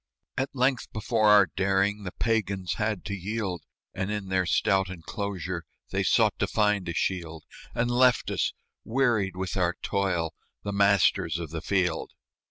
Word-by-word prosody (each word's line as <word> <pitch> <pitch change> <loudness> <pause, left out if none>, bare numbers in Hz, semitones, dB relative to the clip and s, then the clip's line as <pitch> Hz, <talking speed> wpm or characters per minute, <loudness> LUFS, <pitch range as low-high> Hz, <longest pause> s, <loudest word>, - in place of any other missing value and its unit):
At 135 +1 -1
length 130 -1 +1
before 110 0 +2
our 105 -1 +8
daring 100 +2 0
The 90 - -4
Pagans 100 -5 -1
had 105 -4 -1
to 100 - -3
yield, 100 -2 -3 0.3
And 95 0 -3
in 105 -2 -3
their 95 -1 +1
stout 95 +1 +2
enclosure 95 0 -4 0.3
They - - 0
sought - - +3
to - - +1
find 105 -4 +1
a - - -2
shield, 80 -4 -2 0.3
And 120 +1 +1
left 125 0 +3
us, - - 0 0.3
wearied 110 -6 +1
with 95 0 -3
our 90 -2 +1
toil, 90 -5 0 0.3
The 100 - -3
masters 100 -5 +3
of 85 -3 -6
the 80 -1 -4
field. 90 -3 0
100 Hz, 160 wpm, -27 LUFS, 90-105 Hz, 0.3 s, our